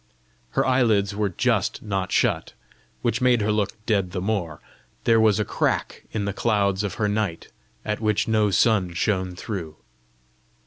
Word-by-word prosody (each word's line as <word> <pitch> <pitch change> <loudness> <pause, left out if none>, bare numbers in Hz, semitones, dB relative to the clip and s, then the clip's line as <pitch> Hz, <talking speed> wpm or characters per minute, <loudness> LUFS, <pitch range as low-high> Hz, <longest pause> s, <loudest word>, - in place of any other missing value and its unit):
Her - - +3
eyelids 110 -6 +2
were 105 -1 0
just 90 - 0
not 95 -3 -2
shut, - - +1 0.5
which 115 - 0
made 125 -2 +4
her 105 +1 +1
look 105 -2 0
dead 100 -5 0
the 95 - -2
more: 90 -6 -2 0.4
there 115 -1 +4
was 110 -2 +4
a 105 - +1
crack - - -1
in 105 -2 -2
the 100 - -2
clouds 100 -2 +1
of 100 -3 -3
her 105 - 0
night, 105 -5 -2 0.4
at 105 0 -2
which 105 -2 +1
no 110 -2 +2
sun 95 -2 +2
shone 95 -1 0
through! 90 -6 -5
105 Hz, 165 wpm, -24 LUFS, 95-110 Hz, 0.5 s, made